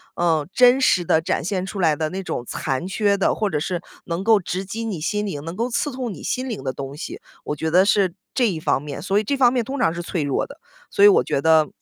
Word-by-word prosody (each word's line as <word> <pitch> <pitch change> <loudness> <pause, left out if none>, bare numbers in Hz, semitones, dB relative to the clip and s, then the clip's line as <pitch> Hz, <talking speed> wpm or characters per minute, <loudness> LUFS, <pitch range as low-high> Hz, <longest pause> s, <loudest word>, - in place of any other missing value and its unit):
呃， 160 -4 +1
真 250 +1 +6
实 185 -9 +3
地 160 - +3
展 165 - -1
现 185 +1 -2
出 195 0 -5
来 155 -3 +3
的 155 -1 -1
那 190 +3 -5
种 125 - -4
残 135 +5 -3
缺 200 +1 +1
的， 195 - +2
或 210 -2 0
者 150 - -1
是 175 +2 -3 0.2
能 170 +3 -3
够 220 -1 +5
直 185 +1 -4
击 225 +4 -5
你 185 -8 -4
心 210 +5 -1
灵， 150 -8 -5
能 165 +1 -6
够 235 +2 -1
刺 280 +4 -1
痛 250 -5 -4
你 - - -11
心 255 +1 -2
灵 230 -5 -5
的 130 - -1
东 135 +1 -7
西。 150 - -7 0.2
我 150 - -4
觉 160 - -1
得 185 +4 +5
是 195 -4 +2 0.2
这 250 -3 +2
一 170 - -3
方 155 - 0
面， 145 -2 -6
所 200 +1 +1
以 - - -2
这 280 - 0
方 250 -3 +4
面 245 -3 0
通 275 +3 -4
常 165 - +2
是 175 - -4
脆 170 -3 -2
弱 140 -2 -1
的， 290 +4 -14 0.3
所 200 - +2
以 205 - +10
我 - - +4
觉 140 - 0
得 160 -1 +4
185 Hz, 295 characters per minute, -22 LUFS, 160-220 Hz, 0.3 s, 以